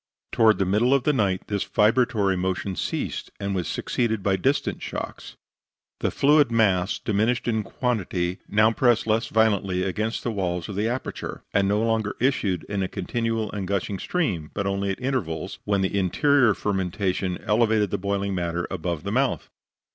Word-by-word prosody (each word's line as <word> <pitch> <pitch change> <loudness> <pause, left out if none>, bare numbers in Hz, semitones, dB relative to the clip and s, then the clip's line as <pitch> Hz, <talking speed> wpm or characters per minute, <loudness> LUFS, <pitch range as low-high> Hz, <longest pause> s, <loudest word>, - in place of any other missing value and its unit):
Toward 110 -1 +4
the 95 - +1
middle 110 +8 +3
of 135 - +1
the 150 - +2
night 100 -7 +1
this 100 -2 -1
vibratory 105 -3 +2
motion 95 +1 -2
ceased, - - -3
and 100 0 -2
was 90 -4 -2
succeeded 110 -5 -1
by 95 -1 +2
distant 135 +10 0
shocks. - - -6 0.6
The - - 0
fluid 145 -2 +4
mass, 100 -5 +2
diminished 110 +4 0
in 110 -2 +1
quantity, 95 -7 -2
now 110 +1 +4
pressed 120 0 +2
less 110 +1 +1
violently 100 -4 +2
against 110 +4 -2
the 120 - -1
walls 90 -4 -2
of 100 - -6
the 105 +3 0
aperture, 125 +3 -4
and 100 -1 +3
no 105 +1 +2
longer 110 -2 0
issued 110 - +1
in 100 -1 -3
a 95 - 0
continual 115 +3 -2
and 100 -3 -4
gushing 100 0 -2
stream, 95 - -1
but 100 - -1
only 100 0 -1
at 95 - -3
intervals, 95 - -3
when 100 -2 +1
the 95 +1 -1
interior 125 - +3
fermentation 95 -2 -1
elevated 110 -2 +2
the 100 - -1
boiling 100 0 -1
matter 85 -1 -2
above 85 -3 -3
the 100 - -3
mouth. 130 +4 0
100 Hz, 170 wpm, -25 LUFS, 95-115 Hz, 0.6 s, Toward